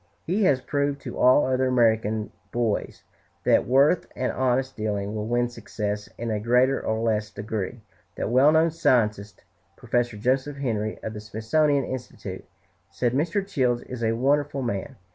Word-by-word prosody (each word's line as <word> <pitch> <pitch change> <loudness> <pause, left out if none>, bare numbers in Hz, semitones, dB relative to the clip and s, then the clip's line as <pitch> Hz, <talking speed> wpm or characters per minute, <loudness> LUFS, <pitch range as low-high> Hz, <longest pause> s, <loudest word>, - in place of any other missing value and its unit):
He 195 +5 +1
has 130 -6 +3
proved 140 +1 -1
to - - -7
all 130 +3 +5
other 130 0 +1
American 110 -3 +1 0.2
boys 115 -3 -2 0.4
that - - +3
worth 140 +7 +4
and 125 - -1
honest 130 +1 0
dealing 105 -1 -2
will 105 0 -3
win 120 +1 +1
success, 105 -3 -5
in 115 -1 -3
a 105 - -1
greater 125 +4 +2
or 110 0 -1
less 105 -2 0
degree. 105 +2 -5 0.3
That - - -3
well 135 +4 +6
known 160 +1 +3
scientist, 105 - 0 0.3
Prof. 120 -1 0
Joseph 130 +5 0
Henry, 110 -6 -2
of 110 - -4
the 105 - -7
Smithsonian 135 +7 +1
Institute, 125 -1 -7 0.4
said, 120 -1 -1
"Mr. 170 +8 0
Childs 125 -9 0
is 125 -2 -7
a 110 0 +2
wonderful 140 +2 +1
man. 100 -6 -3
120 Hz, 160 wpm, -25 LUFS, 110-135 Hz, 0.4 s, well